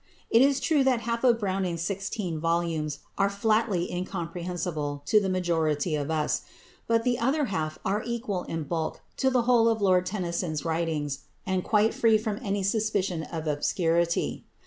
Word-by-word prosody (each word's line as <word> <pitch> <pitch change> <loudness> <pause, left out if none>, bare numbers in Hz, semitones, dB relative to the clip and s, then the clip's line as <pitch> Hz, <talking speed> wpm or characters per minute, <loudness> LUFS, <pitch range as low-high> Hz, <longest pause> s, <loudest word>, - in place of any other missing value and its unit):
It 230 - +6
is 275 0 +4
true 285 +1 +2
that 255 -3 +3
half 230 +1 -2
of 240 -3 +5
Browning's 185 -4 -1
sixteen 195 -2 -3
volumes 165 -3 -1 0.2
are 200 - +4
flatly 200 -3 +1
incomprehensible 175 -5 -3
to 215 +5 +4
the 195 - -1
majority 165 -4 0
of 145 -1 -1
us; 155 -2 0 0.5
but 230 0 +2
the 245 0 +1
other 275 +5 +2
half 155 -2 -2
are 200 +3 +1
equal 230 -6 -2
in 165 -1 -3
bulk 160 +1 -3 0.2
to 265 - +3
the 250 -2 +2
whole 235 -1 +4
of 225 -1 +1
Lord 185 -2 +3
Tennyson's 170 -5 -2
writings, 160 -4 -2 0.2
and 185 -1 0
quite 215 0 +3
free 225 -2 +4
from 215 -1 -3
any 200 -3 -1
suspicion 200 -4 0
of 160 0 -5
obscurity. 165 +3 0
185 Hz, 165 wpm, -27 LUFS, 165-220 Hz, 0.5 s, It